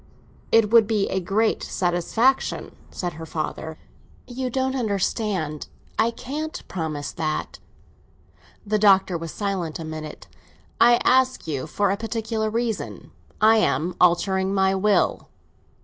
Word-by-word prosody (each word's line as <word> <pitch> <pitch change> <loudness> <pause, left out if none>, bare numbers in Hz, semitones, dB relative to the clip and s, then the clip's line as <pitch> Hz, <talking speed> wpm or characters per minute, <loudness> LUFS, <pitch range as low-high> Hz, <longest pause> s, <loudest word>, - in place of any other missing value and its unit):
"It 225 -2 +4
would 230 -3 +6
be 210 -2 +1
a 190 - 0
great 205 +5 0
satisfaction," 190 +9 0
said 175 -2 -4
her 160 +1 -8
father. 160 0 -4 0.5
"You 255 0 -4
don't 265 +1 -1
understand. 200 - -1 0.3
I 225 - +4
can't 295 +7 -6
promise 155 -5 -4
that." 155 -2 -3 1.1
The 210 +1 +1
Doctor 195 -3 +4
was 165 -1 -5
silent 190 -6 -3
a 165 - -7
minute. 155 -1 -7 0.5
"I 240 0 +6
ask 260 -3 +3
you 150 -2 -3
for 200 +5 0
a 200 - -1
particular 225 0 -2
reason. 230 0 -3 0.3
I 220 +1 +6
am 155 -2 +1
altering 190 +2 +3
my 190 0 +3
will." 200 +1 +1
200 Hz, 130 wpm, -23 LUFS, 170-225 Hz, 1.1 s, would